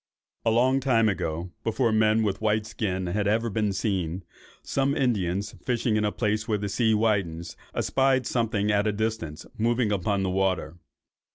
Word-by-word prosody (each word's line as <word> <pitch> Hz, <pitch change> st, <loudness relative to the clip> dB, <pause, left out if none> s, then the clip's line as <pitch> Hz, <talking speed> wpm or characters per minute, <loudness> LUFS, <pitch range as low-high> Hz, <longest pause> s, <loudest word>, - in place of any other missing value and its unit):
"A -, -, +2 dB
long 125 Hz, +4 st, +3 dB
time 120 Hz, -4 st, +3 dB
ago, 85 Hz, -3 st, -2 dB
before 115 Hz, +1 st, +1 dB
men 110 Hz, 0 st, +3 dB
with 100 Hz, -2 st, 0 dB
a -, -, -24 dB
white 110 Hz, 0 st, +1 dB
skin 95 Hz, -4 st, -2 dB
had 100 Hz, +3 st, -1 dB
ever 115 Hz, +2 st, +1 dB
been 105 Hz, 0 st, 0 dB
seen, 95 Hz, -4 st, -2 dB, 0.4 s
some 140 Hz, +1 st, 0 dB
Indians, 100 Hz, -7 st, 0 dB
fishing 120 Hz, -2 st, 0 dB
at 105 Hz, -, +1 dB
a 105 Hz, -, +1 dB
place 110 Hz, +1 st, -1 dB
where 110 Hz, -2 st, +1 dB
the 100 Hz, 0 st, -3 dB
sea 110 Hz, +1 st, +2 dB
widens, 95 Hz, -7 st, 0 dB, 0.2 s
espied 135 Hz, -1 st, +2 dB
something 110 Hz, -3 st, 0 dB
at 105 Hz, +1 st, +2 dB
a -, -, +2 dB
distance 105 Hz, -8 st, -3 dB
moving 115 Hz, 0 st, +1 dB
upon 100 Hz, 0 st, 0 dB
the 95 Hz, -, 0 dB
water. 90 Hz, -4 st, -1 dB
105 Hz, 175 wpm, -26 LUFS, 95-115 Hz, 0.4 s, long